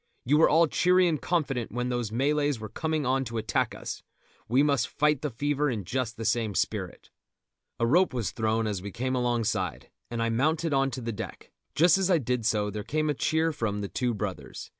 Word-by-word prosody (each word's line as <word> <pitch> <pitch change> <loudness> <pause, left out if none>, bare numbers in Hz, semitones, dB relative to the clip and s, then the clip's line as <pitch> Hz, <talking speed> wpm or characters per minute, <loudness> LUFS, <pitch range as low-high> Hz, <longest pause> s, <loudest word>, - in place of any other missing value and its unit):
You 145 +5 +4
were 160 - +6
all 165 +2 +5
cheery 180 +3 +3
and 155 -4 0
confident 135 -9 -1
when 125 +1 -2
those 120 -3 -2
Malays 145 +2 +1
were 110 -1 -7
coming 155 +3 -2
on 135 +1 +1
to 115 -1 -5
attack 110 0 0
us; - - -6 0.5
we 130 +5 +3
must 140 -4 +2
fight 150 0 +1
the 150 - -1
fever 145 +4 0
in 110 -6 -3
just 120 +3 -3
the 115 - -5
same 110 -4 0
spirit." 95 -4 -3 0.7
A 115 - +2
rope 175 +10 +4
was 120 -5 -2
thrown 110 0 0
as 105 -4 -2
we 100 - -6
came 130 +6 -2
alongside, 115 - -1 0.2
and 120 - -4
I 115 - +1
mounted 155 +7 +1
on 135 0 +2
to 130 - -6
the 115 0 -3
deck; - - -8 0.2
just 170 +3 +5
as 190 -1 +1
I 180 - +5
did 125 -5 -1
so 105 -2 +1
there 105 0 -5
came 155 +5 0
a - - 0
cheer 160 +3 +1
from 105 -7 -2
The 100 - -4
Two 125 -2 -1
Brothers. 95 -10 -6
125 Hz, 215 wpm, -28 LUFS, 110-150 Hz, 0.7 s, were